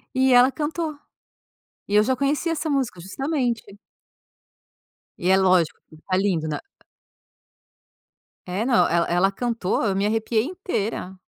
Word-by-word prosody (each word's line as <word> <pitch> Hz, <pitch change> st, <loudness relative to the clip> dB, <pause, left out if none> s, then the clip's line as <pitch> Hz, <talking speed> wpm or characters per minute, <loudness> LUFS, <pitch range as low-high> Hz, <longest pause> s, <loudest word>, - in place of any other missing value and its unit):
E 260 Hz, 0 st, +4 dB
ela 245 Hz, +2 st, +6 dB
cantou. 310 Hz, +1 st, -3 dB, 0.9 s
E 205 Hz, -, -1 dB
eu 210 Hz, -, +6 dB
já 260 Hz, +4 st, +1 dB
conhecia 285 Hz, +5 st, 0 dB
essa 320 Hz, 0 st, -2 dB
música, 265 Hz, -10 st, -1 dB
justamente. 245 Hz, -, -2 dB, 1.5 s
E -, -, -8 dB
é -, -, +4 dB
lógico 185 Hz, -4 st, +2 dB
que 155 Hz, -, -15 dB
tá 185 Hz, -, +1 dB
lindo, 185 Hz, -5 st, 0 dB
né. 155 Hz, -, -3 dB, 1.9 s
É, 185 Hz, +5 st, -2 dB
não 245 Hz, -2 st, +4 dB
ela 170 Hz, 0 st, +2 dB
ela 180 Hz, +3 st, +2 dB
cantou 230 Hz, -3 st, -1 dB
eu 195 Hz, -2 st, +1 dB
me 195 Hz, +1 st, +1 dB
arrepiei 220 Hz, +1 st, +1 dB
inteira. 230 Hz, -, -4 dB
225 Hz, 140 wpm, -23 LUFS, 190-275 Hz, 1.9 s, ela